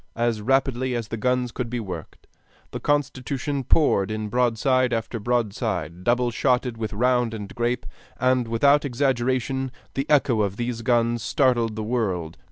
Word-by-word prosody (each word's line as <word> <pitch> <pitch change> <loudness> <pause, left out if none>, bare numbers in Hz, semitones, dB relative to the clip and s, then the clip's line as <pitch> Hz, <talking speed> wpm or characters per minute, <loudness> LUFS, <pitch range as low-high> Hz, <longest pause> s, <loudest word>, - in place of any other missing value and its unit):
As 115 -2 0
rapidly 130 +1 +1
as 115 -3 -4
the - - -3
guns 125 +2 0
could 120 0 -4
be 120 0 -2
worked, 90 -7 -8 0.5
the - - -4
Constitution 140 -1 -1
poured 115 -8 +3
in 110 0 -3
broadside 125 +2 +2
after 115 +1 -2
broadside, 105 - -2
double 120 +2 +2
shotted 125 0 +1
with 110 -1 -4
round 125 +1 +1
and 105 -2 -7
grape; 120 +1 -1 0.3
and 130 -2 +2
without 140 +6 +4
exaggeration, 130 0 0 0.2
the 135 +1 -3
echo 130 -6 +3
of 100 -1 -1
these 120 -1 -3
guns 120 -1 +1
startled 120 -6 +1
the 110 - -3
world. 95 - -2
120 Hz, 155 wpm, -24 LUFS, 110-130 Hz, 0.5 s, without